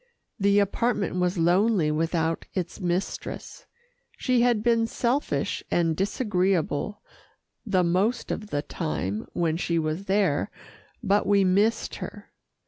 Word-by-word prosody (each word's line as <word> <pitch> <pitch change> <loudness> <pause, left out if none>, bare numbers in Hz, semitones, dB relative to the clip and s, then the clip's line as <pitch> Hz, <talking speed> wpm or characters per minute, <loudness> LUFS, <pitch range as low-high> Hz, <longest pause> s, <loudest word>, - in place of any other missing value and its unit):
The 200 0 +3
apartment 205 -1 +1
was 180 +1 +1
lonely 175 0 +3
without 165 +1 -1
its 180 0 -3
mistress. 180 +2 -3 0.5
She 255 -2 +2
had 240 -3 +3
been 230 -1 +3
selfish 250 +5 -1
and 165 -2 +1
disagreeable 195 - 0 0.6
the 185 -3 +3
most 190 +8 +1
of 210 - -4
the 145 -7 -2
time 110 - -3
when 165 -2 0
she 170 -1 0
was 160 +4 -2
there, 195 -3 +1 0.5
but 205 -1 +2
we 200 -1 +4
missed 205 +5 +1
her. - - -8
190 Hz, 125 wpm, -26 LUFS, 165-210 Hz, 0.6 s, we